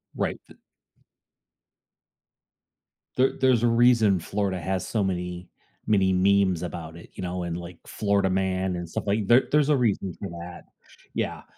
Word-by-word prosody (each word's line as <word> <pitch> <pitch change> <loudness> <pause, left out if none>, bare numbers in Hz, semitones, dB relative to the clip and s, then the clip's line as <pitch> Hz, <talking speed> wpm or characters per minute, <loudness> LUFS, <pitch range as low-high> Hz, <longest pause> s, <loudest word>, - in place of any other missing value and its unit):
Right - - -2
th - - -17 2.6
There 130 +1 +3
there's 130 -3 +3
a - - +4
reason 115 -4 +4
Florida 95 +1 -2
has 95 +2 -2
so 110 -3 0
many, 90 -1 -4 0.4
many 95 -3 +3
memes 95 -2 +2
about 85 -2 -6
it, 85 - -13
you - - -8
know, 90 0 -3
and 85 -1 -3
like 85 0 -9
Florida 100 -2 0
man 95 0 0
and 85 -1 -6
stuff - - -4
like 100 0 0
there 120 +2 +6
there's 150 -1 +3
a 150 - +4
reason 100 -6 0
for 100 - -5
that, 85 +1 -9 0.5
yeah. - - -3
95 Hz, 155 wpm, -25 LUFS, 90-110 Hz, 2.6 s, there